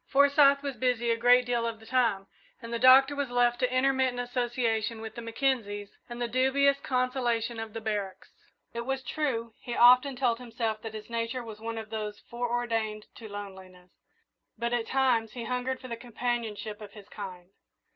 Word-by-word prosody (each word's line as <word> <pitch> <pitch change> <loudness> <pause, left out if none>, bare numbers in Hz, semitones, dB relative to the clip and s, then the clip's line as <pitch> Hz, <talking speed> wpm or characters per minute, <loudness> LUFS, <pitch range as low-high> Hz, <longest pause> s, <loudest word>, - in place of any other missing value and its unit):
Forsyth 280 0 +5
was 275 -3 -4
busy 240 -1 +1
a - - +3
great 245 +2 +5
deal 240 -1 0
of 225 -1 -5
the 220 - -15
time, 230 -6 +1 0.3
and 230 0 -8
the 235 - -1
Doctor 265 +3 +7
was 285 -2 -2
left 245 0 +2
to 250 -1 +1
intermittent 260 -1 +2
association 240 -2 -1
with 220 -1 -7
the 235 - -7
Mackenzies 225 -4 -2 0.2
and 240 0 -7
the 240 - -1
dubious 270 +3 +2
consolation 250 -3 -1
of 225 -1 -6
the 225 - -5
barracks. 205 -3 -4 0.4
It 235 0 -3
was 270 -1 -2
true, 240 -5 -2
as - - -25
he 240 - -3
often 250 +3 +6
told 245 -2 +1
himself, 225 -3 -3
that 220 -1 -7
his 215 -1 -8
nature 230 +2 -3
was 220 -2 -9
one 225 +1 -5
of 220 -1 -7
those 210 -1 -4
foreordained 235 -3 -2
to 220 -2 -9
loneliness, 190 -3 -10 0.7
but 235 0 -2
at 235 -2 0
times 245 -5 +1
he 240 - -5
hungered 250 +1 -2
for 255 - -9
the 235 - -4
companionship 225 -3 -4
of 205 -1 -10
his 205 -2 -13
kind. 185 -3 -9
235 Hz, 185 wpm, -29 LUFS, 220-255 Hz, 0.7 s, Doctor